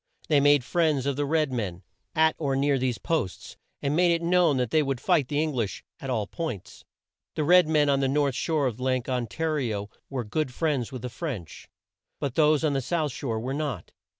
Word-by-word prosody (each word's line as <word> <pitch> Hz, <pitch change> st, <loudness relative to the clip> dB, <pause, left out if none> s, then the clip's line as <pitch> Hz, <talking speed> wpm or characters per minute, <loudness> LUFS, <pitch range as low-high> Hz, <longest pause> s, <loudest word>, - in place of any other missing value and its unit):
They 150 Hz, -2 st, +5 dB
made 145 Hz, -1 st, +5 dB
friends 150 Hz, -1 st, +1 dB
of 140 Hz, -1 st, 0 dB
the 145 Hz, +1 st, -1 dB
red 155 Hz, -2 st, +1 dB
men 95 Hz, -6 st, -3 dB, 0.3 s
at 160 Hz, 0 st, +4 dB
or 140 Hz, -4 st, 0 dB
near 140 Hz, 0 st, +2 dB
these 125 Hz, -2 st, 0 dB
posts, 160 Hz, -, -3 dB, 0.3 s
and 140 Hz, +1 st, +1 dB
made 175 Hz, +1 st, +4 dB
it 170 Hz, 0 st, 0 dB
known 170 Hz, -4 st, +3 dB
that 125 Hz, -3 st, -1 dB
they 155 Hz, -, +4 dB
would 135 Hz, -3 st, -1 dB
fight 155 Hz, -2 st, +2 dB
the 145 Hz, +2 st, -1 dB
Eng 155 Hz, -1 st, 0 dB
lish 115 Hz, -6 st, -3 dB, 0.2 s
at 135 Hz, -, -6 dB
all 110 Hz, -5 st, 0 dB
points. 125 Hz, -, -6 dB, 0.5 s
The 155 Hz, -, 0 dB
red 180 Hz, +2 st, +6 dB
men 150 Hz, -2 st, +3 dB
on 140 Hz, -1 st, +3 dB
the 135 Hz, -, +1 dB
north 140 Hz, 0 st, +1 dB
shore 155 Hz, +1 st, 0 dB
of 125 Hz, -2 st, -2 dB
Lake 130 Hz, -1 st, 0 dB
On 125 Hz, -3 st, -1 dB
ta 160 Hz, -, -5 dB
ri 150 Hz, -7 st, 0 dB
o 100 Hz, +1 st, -6 dB, 0.2 s
were 130 Hz, -3 st, -3 dB
good 130 Hz, +5 st, -2 dB
friends 140 Hz, -4 st, -1 dB
with 130 Hz, -3 st, -7 dB
the 125 Hz, -, -3 dB
French; 115 Hz, -, -6 dB, 0.5 s
but 140 Hz, -4 st, -2 dB
those 155 Hz, +1 st, +3 dB
on 150 Hz, -2 st, +2 dB
the 135 Hz, -, 0 dB
south 155 Hz, +1 st, -1 dB
shore 115 Hz, -3 st, -3 dB
were 130 Hz, +4 st, -3 dB
not. 140 Hz, -, -4 dB
140 Hz, 225 wpm, -26 LUFS, 125-155 Hz, 0.5 s, red